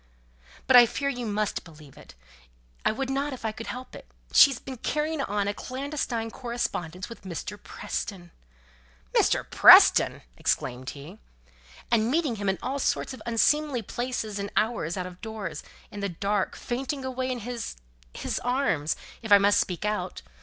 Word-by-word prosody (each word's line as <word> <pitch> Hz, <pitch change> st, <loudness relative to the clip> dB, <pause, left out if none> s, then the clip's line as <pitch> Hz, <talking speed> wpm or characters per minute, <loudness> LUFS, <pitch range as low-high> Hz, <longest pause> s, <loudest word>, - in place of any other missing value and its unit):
"But 265 Hz, -, +5 dB
I 240 Hz, -1 st, +10 dB
fear 280 Hz, +4 st, -2 dB
you 245 Hz, -3 st, -4 dB
must 210 Hz, 0 st, -1 dB
believe 150 Hz, -4 st, -15 dB
it. -, -, -15 dB, 0.7 s
I -, -, +3 dB
would 265 Hz, +4 st, -3 dB
not 280 Hz, +1 st, -1 dB
if 250 Hz, -, -8 dB
I 220 Hz, -, 0 dB
could 225 Hz, +1 st, -8 dB
help 255 Hz, +1 st, -7 dB
it. -, -, -11 dB, 0.3 s
She's 275 Hz, -4 st, +7 dB
been 260 Hz, 0 st, -8 dB
carrying 305 Hz, +4 st, -1 dB
on 205 Hz, -4 st, -1 dB
a 205 Hz, -, 0 dB
clandestine 255 Hz, -2 st, -3 dB
correspondence 185 Hz, -8 st, -4 dB
with 230 Hz, -, -11 dB
Mr. 190 Hz, +3 st, -6 dB
Preston! 175 Hz, -4 st, -5 dB, 0.4 s
" -, -, -23 dB
"Mr. -, -, +3 dB
Preston!" -, -, +7 dB
exclaimed 130 Hz, +1 st, -1 dB
he. 150 Hz, +9 st, -10 dB, 0.7 s
"And 225 Hz, -1 st, +3 dB
meeting 290 Hz, -5 st, +1 dB
him 200 Hz, -1 st, -1 dB
at 190 Hz, -, 0 dB
all 270 Hz, +2 st, -2 dB
sorts 270 Hz, -, 0 dB
of 255 Hz, -, -10 dB
unseemly 260 Hz, +2 st, +2 dB
places 225 Hz, -2 st, -3 dB
and 200 Hz, 0 st, -3 dB
hours, 215 Hz, -6 st, 0 dB
out 180 Hz, -, -2 dB
of 180 Hz, 0 st, -10 dB
doors, 215 Hz, -9 st, -5 dB, 0.3 s
in 205 Hz, -, -7 dB
the 200 Hz, 0 st, -2 dB
dark, 200 Hz, +3 st, -1 dB
fainting 265 Hz, +2 st, -4 dB
away 260 Hz, 0 st, -2 dB
in 250 Hz, -2 st, -3 dB
his 240 Hz, +1 st, -5 dB, 0.4 s
his -, -, -3 dB
arms, 245 Hz, -, 0 dB, 0.3 s
if 220 Hz, -2 st, -7 dB
I 205 Hz, -, +10 dB
must 200 Hz, +1 st, +4 dB
speak 180 Hz, +2 st, -2 dB
out. 210 Hz, 0 st, -3 dB
220 Hz, 170 wpm, -27 LUFS, 190-255 Hz, 0.7 s, I